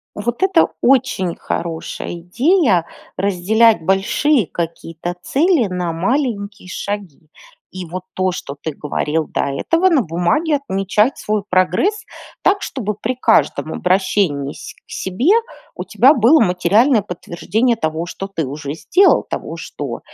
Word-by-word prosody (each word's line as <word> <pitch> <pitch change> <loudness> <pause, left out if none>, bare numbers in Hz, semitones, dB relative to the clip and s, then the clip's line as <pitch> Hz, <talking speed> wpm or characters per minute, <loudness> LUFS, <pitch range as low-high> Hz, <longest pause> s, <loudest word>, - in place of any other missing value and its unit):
Вот 235 +3 -3
это 375 -3 +4
очень 245 -9 +2
хорошая 165 0 -5
идея 195 - +2 0.3
разделять 200 +2 +3
большие 210 - +2
какие-то 170 +1 -5
цели 300 - +2
на 180 -2 -3
маленькие 200 - -2
шаги. 195 -7 -6 0.4
И 185 -1 -6
вот 180 +1 -5
то, 185 0 0
что 140 -5 -6
ты 160 - -2
говорил 150 +2 -2
до - - -2
этого- 330 - +1
на 315 -7 +3
бумаге 180 - 0
отмечать 210 -2 0
свой 210 -1 -2
прогресс 395 - +1 0.4
так, 395 0 +2
чтобы 215 -6 -3
при 220 +5 -3
каждом 225 -9 +1
обращении 180 -6 0
се - - -10
к - - -31
себе 200 - 0 0.4
у - - -5
тебя 270 +4 +4
было 265 +4 +5
материальное 215 +6 +3
подтверждение 200 +6 -1
того, 160 -5 -2
что 195 +2 -7
ты 165 -5 -1
уже 140 +2 -6
сделал, 375 - +3
того, - - -5
что - - -6
195 Hz, 135 wpm, -18 LUFS, 175-255 Hz, 0.4 s, было